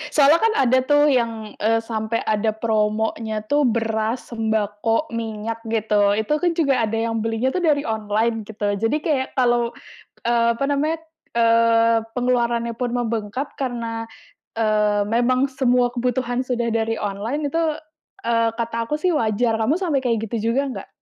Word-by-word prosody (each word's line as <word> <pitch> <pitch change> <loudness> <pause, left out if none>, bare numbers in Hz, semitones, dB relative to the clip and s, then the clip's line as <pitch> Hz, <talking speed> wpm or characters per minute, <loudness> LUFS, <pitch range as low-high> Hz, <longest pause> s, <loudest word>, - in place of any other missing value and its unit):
Soalnya 295 +3 +6
kan 450 0 +3
ada 260 -1 +4
tuh 290 +3 +3
yang, 230 -4 -1
eee, 225 +2 +2
sampai 225 0 -2
ada 215 +1 +1
promonya 220 0 -1
tuh 290 +6 +2
beras, 225 +1 -1
sembako, 220 +3 -1
minyak 225 0 -4
gitu. 210 -2 +2
Itu 255 +8 0
kan 355 -1 +2
juga 275 -6 +2
ada 220 +1 -2
yang 225 0 -1
belinya 225 +4 -1
tuh 365 - -1
dari 295 -3 +2
online 220 +1 -1
gitu, 205 -1 -2
jadi 225 +8 +1
kayak 280 -5 0
kalau, 240 -2 +2 0.6
eee, 235 -1 +3
apa 275 - -2
namanya, 295 +3 +1 0.4
eee, 230 0 +4
pengeluarannya 235 -2 0
pun 245 0 -2
membengkak 235 +2 -3
karena, 235 -3 -3 0.6
eee, 210 -1 +2
memang 255 +4 +2
semua 250 -2 +2
kebutuhan 245 0 -1
sudah 240 -2 -1
dari 225 0 -1
online 220 +9 -2
itu, 330 +4 0 0.7
eee, 230 -1 +2
kata 230 0 -2
aku 300 0 -2
sih 365 +1 +2
wajar. 225 -1 +1
Kamu 225 +8 +1
sampai 320 -8 +1
kayak 225 -2 0
gitu 230 +1 -1
juga 270 +3 +2
nggak? 260 - -7
230 Hz, 155 wpm, -22 LUFS, 220-255 Hz, 0.7 s, Soalnya